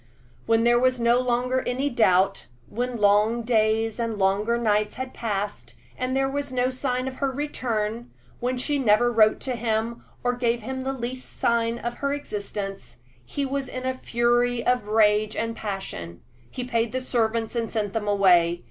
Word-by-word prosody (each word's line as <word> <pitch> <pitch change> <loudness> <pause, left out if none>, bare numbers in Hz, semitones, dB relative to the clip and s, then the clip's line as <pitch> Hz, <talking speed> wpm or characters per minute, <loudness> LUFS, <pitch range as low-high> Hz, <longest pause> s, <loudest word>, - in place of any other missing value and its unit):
When 225 0 +3
there 240 0 +4
was 255 0 +2
no 235 +1 +4
longer 250 +1 0
any 260 +3 0
doubt 195 -6 +2 0.2
when 245 +2 -3
long 210 +3 +3
days 220 -1 +1
and 230 -2 -2
longer 205 +4 +1
nights 210 -2 +1
had 260 0 -5
passed, 205 -3 -4 0.2
and 255 +1 -1
there 270 0 +2
was 285 0 -3
no 255 0 +1
sign 255 0 -2
of 260 - -6
her 275 -1 0
return 240 -5 -3 0.3
when 250 +1 -1
she 285 +3 -1
never 240 0 +3
wrote 215 -1 +4
to 255 -2 -2
him 230 0 -2 0.2
or 245 0 +1
gave 240 -2 0
him 260 +3 -4
the 265 +1 -2
least 255 0 -5
sign 235 0 +1
of 240 0 -5
her 280 0 -1
existence, 200 - -6 0.2
he 280 - -3
was 275 0 -2
in 255 0 -5
a 260 - 0
fury 240 -1 +1
of 250 -4 +1
rage 215 0 +3
and 230 0 -2
passion. 190 - -6 0.3
He 250 - -5
paid 235 -2 -1
the 260 - 0
servants 230 -2 0
and 230 -1 -1
sent 210 -3 -2
them 215 -2 -2
away. 175 -4 +4
235 Hz, 175 wpm, -25 LUFS, 215-255 Hz, 0.3 s, there